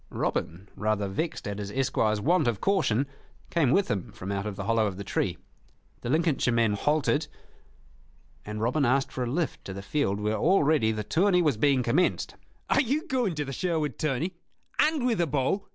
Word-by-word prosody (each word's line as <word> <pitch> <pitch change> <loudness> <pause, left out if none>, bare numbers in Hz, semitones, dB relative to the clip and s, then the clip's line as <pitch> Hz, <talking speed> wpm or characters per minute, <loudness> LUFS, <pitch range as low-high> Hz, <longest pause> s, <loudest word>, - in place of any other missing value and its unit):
Robin, 90 +5 -3
rather 105 -1 0
vexed 155 - -3
at 100 0 -4
his 100 -1 -4
esquire's 110 -3 +1
want 160 - +2
of 115 -5 0
caution, 145 - +2 0.5
came 160 -7 +2
with 195 +9 +3
him 100 -6 -3
from 95 +2 -6
out 100 +1 -2
of 105 - -4
the 100 - -5
hollow 110 0 +2
of 95 -2 -5
the 100 - -5
tree. 90 -2 -1 0.6
The 120 - -4
Lincolnshire 155 -3 +2
men 115 -2 +2
halted, 150 +6 +1 1.2
and 105 0 -6
Robin 125 +7 +1
asked 135 +2 +2
for 130 - -3
a - - -4
lift 160 +4 -2
to 95 - -5
the 100 +1 -7
field 100 -3 0
where 105 +1 0
already 150 - +3
the 110 -1 -3
tourney 180 - +3
was 150 -6 +2
being 130 +3 +2
commenced. 145 +10 +1 0.3
"Are - - +4
you 300 +6 -1
going 245 -10 0
to 150 -1 -2
the 135 - -5
Sherwood 160 -5 -1
tourney, 155 +5 -1 0.5
and 300 -4 +3
with 230 -7 +2
a 170 - +1
bow?" 140 +8 0
135 Hz, 195 wpm, -27 LUFS, 105-165 Hz, 1.2 s, Are